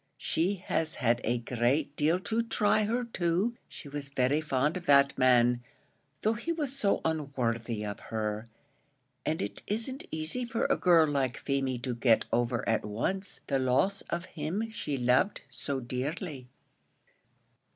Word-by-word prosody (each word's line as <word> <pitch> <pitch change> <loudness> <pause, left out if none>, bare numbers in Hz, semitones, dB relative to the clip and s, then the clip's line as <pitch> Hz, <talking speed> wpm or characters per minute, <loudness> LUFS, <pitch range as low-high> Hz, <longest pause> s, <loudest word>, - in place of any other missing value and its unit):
She 180 +5 0
has 165 -3 -2
had 120 -2 +1
a 120 +2 +1
great 125 +5 0
deal 155 +5 +2
to 220 +4 0
try 215 -2 +2
her 240 +4 0
too; 190 0 0
she - - -10
was 140 0 -6
very 140 +2 +2
fond 150 +1 +1
of 180 - -6
that 140 -1 +6
man, 125 -1 +4 0.6
though 220 - +3
he 235 +9 -3
was 295 -5 -2
so 205 -8 +1
unworthy 120 -8 -1
of 105 -1 -5
her; 110 0 -2 0.8
and 160 +4 0
it - - -5
isn't 230 +6 -2
easy 160 +10 -2
for 235 -1 -1
a - - +3
girl 170 -3 +5
like 135 -4 0
Feemy 135 -2 -1
to 125 - -1
get 115 -1 +3
over 120 0 +1
at 110 -1 +2
once 180 - -3
the 135 -2 +1
loss 130 +11 +2
of 170 +1 -2
him 185 +10 -3
she 145 -9 -3
loved 125 +11 +2
so 140 -2 -2
dearly." 130 +3 -4
145 Hz, 155 wpm, -30 LUFS, 125-190 Hz, 0.8 s, that